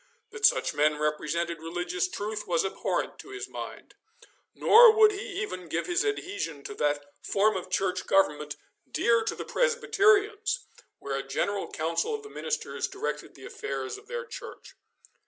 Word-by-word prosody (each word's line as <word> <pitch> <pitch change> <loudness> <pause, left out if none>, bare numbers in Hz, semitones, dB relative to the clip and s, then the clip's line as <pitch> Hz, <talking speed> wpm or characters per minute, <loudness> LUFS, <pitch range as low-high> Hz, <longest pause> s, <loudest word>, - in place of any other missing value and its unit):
That 445 0 +5
such - - 0
men 150 0 +2
represented 150 +3 -1
religious 175 +2 -2
truth 210 +3 -4
was 170 +1 +1
abhorrent 190 - -2
to - - -11
his 400 0 -6
mind, - - -8 0.6
nor 465 +1 +8
would 430 -1 +6
he 395 -1 -5
even 185 - -6
give 165 +2 -1
his 355 +2 +1
adhesion 400 - -3
to - - -6
that 145 -1 0 0.2
form 210 +1 +2
of 185 0 -4
church 185 0 -1
government 150 -6 +2 0.3
dear 235 -1 +3
to 225 - -2
the - - -6
Presbyterians, 435 -1 +2 0.3
where 135 -1 -4
a - - -1
general 195 +9 -2
council 165 - -1
of 435 - -7
the 425 - -10
ministers - - -3
directed 400 +3 -5
the - - -12
affairs 425 0 -4
of 425 - -20
their 480 0 -4
church. - - -10
210 Hz, 160 wpm, -28 LUFS, -, 0.6 s, nor